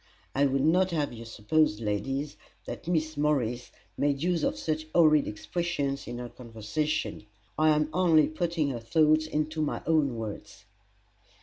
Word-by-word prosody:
[I 140 +1 +3
would 135 +1 +1
not 180 +4 +3
have 150 -7 -1
you 115 0 -9
suppose, 115 +2 +1
ladies, 135 +7 -2 0.3
that - - -7
Miss 160 -2 0
Morris 125 -5 0 0.3
made 140 0 +1
use 175 -2 +1
of - - 0
such 155 0 -2
horrid 155 -3 +5
expressions 140 +5 -3
in 120 - -5
her 120 0 -6
conversation: 115 +3 -3 0.3
I 155 0 +3
am 150 0 +3
only 165 -4 +4
putting 165 -3 -1
her 120 - -4
thoughts 155 +6 +3
into 155 +1 -2
my 150 - -2
own 150 -6 +2
words. 110 -2 -7
150 Hz, 150 wpm, -28 LUFS, 120-155 Hz, 0.3 s, horrid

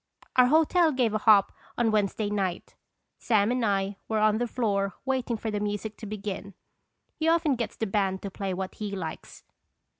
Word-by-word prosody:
Our 250 -1 +6
hotel 320 +3 +4
gave 250 -5 +1
a 215 - +1
hop 210 -2 +5 0.3
on 235 -2 +2
Wednesday 205 0 0
night. 190 -4 -2 0.5
Sam 215 -1 +2
and 250 -1 0
I 200 -1 0
were 220 - -1
on 215 0 +3
the 245 - 0
floor 200 -5 -1
waiting 255 -3 -1
for 220 0 -4
the 210 - -1
music 205 +1 -3
to 220 - -8
begin. 200 -2 -6 0.6
He 315 - -2
often 330 -3 +3
gets 235 -2 -3
the 225 - -1
band 195 -2 -1
to 200 - -5
play 195 0 -4
what 185 +1 -4
he 205 -2 -5
likes. 165 -5 -7
215 Hz, 185 wpm, -27 LUFS, 200-240 Hz, 0.6 s, Our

